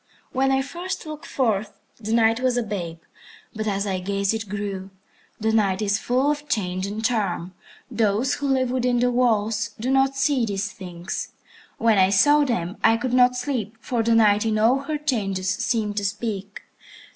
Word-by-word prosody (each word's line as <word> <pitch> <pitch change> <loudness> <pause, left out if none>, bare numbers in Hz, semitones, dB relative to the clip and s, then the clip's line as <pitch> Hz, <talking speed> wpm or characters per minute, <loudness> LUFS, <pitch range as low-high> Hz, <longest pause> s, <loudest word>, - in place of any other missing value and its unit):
When 270 +1 +1
I 270 0 +2
first 350 +6 -5
looked 310 0 -8
forth, 215 -5 -1 0.2
the 220 -1 -5
Night 225 0 +3
was 255 -1 +1
a 245 - +1
babe, 180 -6 -4 0.6
but 215 0 -4
as 200 -1 0
I 190 -2 -1
gazed 200 +2 0
it 220 -3 -4
grew. 200 -1 -4 0.5
The 220 0 0
Night 200 -4 +2
is 205 -1 +1
full 260 +4 +1
of 295 0 -5
change 185 -3 -1
and 215 +2 -4
charm. 195 -6 -1 0.4
Those 225 +4 +1
who 285 - -2
live 260 -2 +1
within 250 -1 +1
the 245 0 +2
walls 225 -3 +1
do 250 +4 -1
not 270 0 +3
see 270 -2 +2
these 205 -1 -2
things. 180 -2 -6 0.4
When 225 -3 +3
I 190 0 +5
saw 290 +10 +5
them, 190 -7 -2
I 225 0 +5
could 245 +1 -3
not 250 0 +5
sleep, 245 -4 -3
for 235 0 -1
the 230 0 +2
Night 210 -2 +4
in 220 -1 0
all 230 +5 +4
her 300 +2 -3
changes 200 -10 -1
seemed 210 +1 -1
to 205 - 0
speak. 200 -1 -4
220 Hz, 185 wpm, -23 LUFS, 200-250 Hz, 0.6 s, I